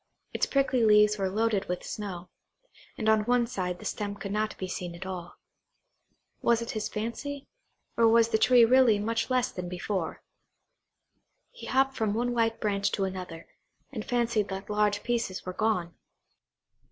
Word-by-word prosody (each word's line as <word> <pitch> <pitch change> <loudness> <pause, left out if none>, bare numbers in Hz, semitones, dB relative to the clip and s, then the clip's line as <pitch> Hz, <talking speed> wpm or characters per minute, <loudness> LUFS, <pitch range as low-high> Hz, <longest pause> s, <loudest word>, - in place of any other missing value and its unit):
Its - - 0
prickly 270 -3 +2
leaves 210 -1 +5
were 190 -1 0
loaded 210 0 0
with 180 - -3
snow, 185 -4 -6 0.7
and 220 - -2
on 220 -1 +5
one 245 0 +3
side 185 -7 -3
the - - -12
stem 205 -1 -3
could 200 -1 -6
not 215 +1 -1
be 185 - -4
seen 180 -1 -5
at 170 - -8
all. 180 -2 -6 1.1
Was 235 -1 +3
it 235 - -4
his 215 -1 -3
fancy, 270 +6 -5 0.5
or 230 -1 +4
was 230 0 +5
the 220 -1 +1
tree 245 0 +6
really 245 -2 +5
much 225 +3 -1
less 255 -1 +1
than 180 -1 -6
before? 180 -1 -3 1.3
He - - -10
hopped 270 +1 +2
from 215 -2 0
one 245 +2 0
white 225 -1 +1
branch 200 -2 0
to 195 - 0
another, 185 -3 -5 0.4
and 225 -6 -5
fancied 235 -4 0
that 195 +2 -6
large 210 -1 +1
pieces 235 -6 -2
were 185 - -4
gone. 180 -5 0
215 Hz, 165 wpm, -28 LUFS, 190-235 Hz, 1.3 s, tree